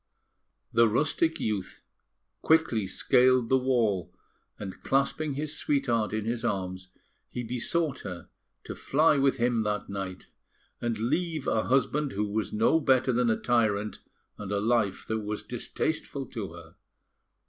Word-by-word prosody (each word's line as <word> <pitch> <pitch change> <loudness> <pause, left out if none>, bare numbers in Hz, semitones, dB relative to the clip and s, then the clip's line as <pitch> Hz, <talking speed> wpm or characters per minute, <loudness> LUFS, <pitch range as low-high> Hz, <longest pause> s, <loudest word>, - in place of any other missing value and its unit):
The 115 -1 +5
rustic 160 +7 +1
youth 100 -4 -3 0.6
quickly 130 -11 +3
scaled 125 +4 +3
the 130 - +5
wall; 115 -8 +1 0.5
and, 95 -2 -8
clasping 140 +2 0
his 150 +2 -3
sweetheart 120 -9 0
in 110 0 -2
his 115 +1 -2
arms, 95 -4 -3 0.4
he 125 - -4
besought 130 +6 -1
her 90 -3 -7 0.4
to - - -6
fly 150 +1 +3
with 135 -1 +2
him 120 -1 +1
that 105 -1 -2
night, 95 -2 -5 0.6
and 120 -2 -1
leave 155 +6 -1
a 110 - +1
husband 135 +3 +1
who 105 +2 -1
was 105 +1 -2
no 115 +9 +3
better 130 -3 +3
than 120 0 +2
a 110 - +2
tyrant, 110 -3 +1 0.4
and 105 -1 -6
a 100 - +1
life 105 -2 +1
that 110 0 -1
was 105 0 -4
distasteful - - -3
to - - -5
her. - - -13
115 Hz, 145 wpm, -28 LUFS, 105-135 Hz, 0.6 s, The